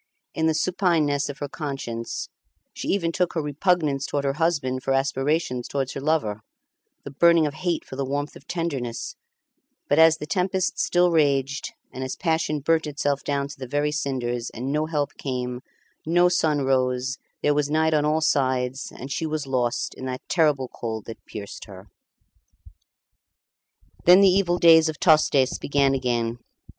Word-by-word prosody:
In 160 0 +1
the 160 - +1
supineness 160 -5 +1
of 145 - -6
her 145 - -4
conscience 135 -6 -5 0.5
she - - -6
even 170 -4 +1
took 180 0 0
her 165 - -1
repugnance 150 -2 0
towards 140 -1 -2
her 135 - +1
husband 145 -5 0
for 135 - 0
aspirations 135 -1 0
towards 135 -2 -2
her 135 - -5
lover, 140 -9 0 0.6
the 140 - -8
burning 170 +3 +4
of 145 - -2
hate 175 0 -2
for - - -9
the 135 - -2
warmth 145 +2 -3
of 135 - -15
tenderness; 140 -9 -3 0.7
but 145 - +2
as 160 0 +7
the - - -6
tempest 185 +3 -1
still 175 0 +3
raged, 145 -3 +1 0.2
and 130 - -5
as 130 - -4
passion 160 -3 -1
burnt 160 +2 +1
itself 145 -1 -1
down 140 -1 -1
to 140 - -11
the 130 - -6
very 145 +3 0
cinders, 125 -4 -2
and 125 +4 -5
no 155 +1 0
help 150 -3 -1
came, 125 -2 -3 0.4
no 175 +2 +3
sun 155 -5 +1
rose, 130 0 0 0.2
there 145 - +3
was 145 0 0
night 160 +1 +2
on 150 -1 +3
all 155 +1 +1
sides, 130 -3 0
and 135 +2 -8
she 160 - -2
was 155 -2 -3
lost 125 -3 -1
in 130 - -8
the 130 0 -3
terrible 150 -6 +2
cold 110 -3 -6
that 115 - -10
pierced 100 -2 -8
her. 95 -1 -12 2.2
Then 180 +3 +8
the 200 - +7
evil 180 -2 +2
days 165 -2 +6
of 155 - -6
Tostes 150 -5 +3
began 140 -1 +2
again. 120 -3 -1
145 Hz, 170 wpm, -24 LUFS, 130-160 Hz, 2.2 s, Then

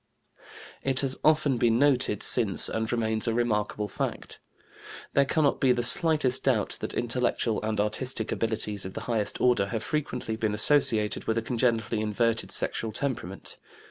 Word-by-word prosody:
" - - -19 0.3
It 135 -1 +3
has 135 -1 -1
often 155 -4 +2
been 115 -1 +2
noted 130 -6 +1
since 110 -6 +4
and 110 0 -3
remains 110 -2 -1
a 115 - 0
remarkable 105 -3 -1
fact. - - -5 0.7
There 140 - +3
cannot 145 0 0
be 130 -3 +4
the 120 -1 -2
slightest 135 -2 +3
doubt 120 -7 0
that - - -5
intellectual 120 -2 -1
and 110 -1 -3
artistic 110 +2 -3
abilities 110 -3 -2
of 95 - -8
the - - -5
highest 110 -4 -1
order 120 -6 +2
have 110 +3 -4
frequently 130 -7 -3
been 110 -2 -2
associated 110 -3 +2
with 110 - -1
a 115 - -1
congenitally 115 -2 -1
inverted 110 +2 -1
sexual 110 - +1
temperament. 110 -7 -4
115 Hz, 160 wpm, -26 LUFS, 110-130 Hz, 0.7 s, since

